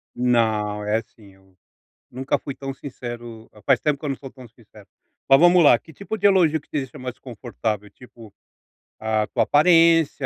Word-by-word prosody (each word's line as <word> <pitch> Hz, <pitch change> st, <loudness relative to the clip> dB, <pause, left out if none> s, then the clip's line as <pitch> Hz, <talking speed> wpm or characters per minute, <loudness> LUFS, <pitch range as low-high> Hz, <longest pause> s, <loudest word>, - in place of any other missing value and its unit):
Não, 110 Hz, -4 st, 0 dB
é 105 Hz, +2 st, 0 dB
sim 100 Hz, -4 st, -20 dB
eu, 95 Hz, -1 st, -26 dB, 0.5 s
nunca 130 Hz, +2 st, -2 dB
fui 140 Hz, -, -8 dB
tão 135 Hz, -1 st, -6 dB
sincero 120 Hz, -4 st, -9 dB
a 105 Hz, -, -18 dB
faz 135 Hz, 0 st, +2 dB
tempo 150 Hz, -2 st, -1 dB
que -, -, -9 dB
eu 145 Hz, -, -2 dB
não 135 Hz, -, -2 dB
sou 135 Hz, 0 st, -11 dB
tão 130 Hz, -2 st, -14 dB
sincero. 110 Hz, -3 st, -20 dB, 0.4 s
Mas 135 Hz, +1 st, +7 dB
vamos 175 Hz, 0 st, +5 dB
lá, 135 Hz, -5 st, +6 dB
que 160 Hz, -, -17 dB
tipo 210 Hz, +2 st, -6 dB
de 205 Hz, -, +3 dB
elogio 170 Hz, -6 st, +3 dB
te -, -, -28 dB
deixa 135 Hz, -4 st, -5 dB
mais 125 Hz, -1 st, -6 dB
desconfortável, 110 Hz, -4 st, -5 dB
tipo, 115 Hz, -4 st, -16 dB, 0.7 s
a 110 Hz, -1 st, -1 dB
tua -, -, 0 dB
aparência, 165 Hz, -2 st, +3 dB
125 Hz, 185 wpm, -22 LUFS, 110-145 Hz, 0.7 s, Mas